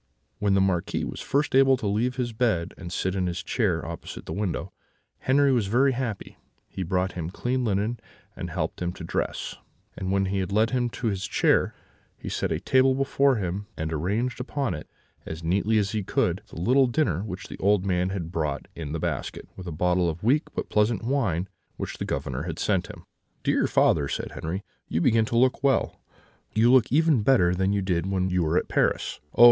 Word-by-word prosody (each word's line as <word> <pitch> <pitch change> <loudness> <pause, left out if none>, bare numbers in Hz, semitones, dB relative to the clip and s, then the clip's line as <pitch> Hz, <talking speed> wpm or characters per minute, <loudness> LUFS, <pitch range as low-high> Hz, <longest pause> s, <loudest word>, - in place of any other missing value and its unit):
"When 100 -1 +2
the 95 - +4
Marquis 95 -3 0
was - - -6
first 145 +1 0
able 135 0 +6
to 110 - -6
leave 110 +5 0
his 120 -3 -2
bed, 110 -8 0
and 85 -3 -8
sit 95 +1 -1
in 95 -2 0
his 90 +1 -3
chair 90 -8 0
opposite 85 0 -7
the - - -5
window, 100 -3 -3 0.5
Henri 140 +1 +3
was 120 -6 +2
very 130 +6 +3
happy: 120 -6 -4 0.3
he - - -7
brought 90 +1 0
him 85 -2 -4
clean 125 +7 -1
linen, 110 +2 0 0.4
and - - -5
helped - - -3
him 90 0 -1
to 85 - -9
dress; 80 - -3 0.4
and 95 0 -3
when 95 0 +2
he 95 +1 -1
had 95 0 -2
led 110 +3 +3
him 125 -2 +1
to 120 - -6
his 95 -3 -2
chair, - - +2 0.4
he - - -7
set - - -1
a - - 0
table 130 0 +3
before 135 0 +3
him, 100 0 -3
and 80 0 -2
arranged 105 - -1
upon 135 -3 -2
it, 75 - -7 0.3
as 80 +1 -7
neatly 100 +6 +2
as 100 -2 +1
he 110 - -1
could, 95 - 0
the - - -9
little 130 +8 +4
dinner 120 - +1
which 95 -2 -6
the - - -9
old 100 -1 +3
man 90 -1 +1
had 90 -4 -4
brought 75 -5 -2
in 75 -3 -5
the 80 - -2
basket, - - -3
with 95 -1 -9
a - - -3
bottle 90 +2 +2
of 80 +3 -6
weak 140 +7 +3
but - - -2
pleasant 105 +2 +2
wine 110 - 0 0.3
which - - -5
the - - -2
Governor 65 +1 -3
had 80 -1 -4
sent 95 -3 0
him. - - -11 0.4
"'Dear - - +2
father,' 75 -3 +3
said - - -4
Henri, 90 +5 -4 0.2
'you 80 - -1
begin 110 +4 +3
to 115 - -1
look 130 +2 +3
well; 135 -1 +1 0.5
you 115 +3 +5
look 130 -4 +5
even 155 -3 +4
better 105 -7 +4
than 95 +2 +1
you 100 -1 0
did 90 -2 0
when 95 -1 0
you 90 0 +2
were 80 +1 +1
at - - 0
Paris. - - 0 0.2
Oh! - - -8
100 Hz, 210 wpm, -26 LUFS, 90-120 Hz, 0.5 s, able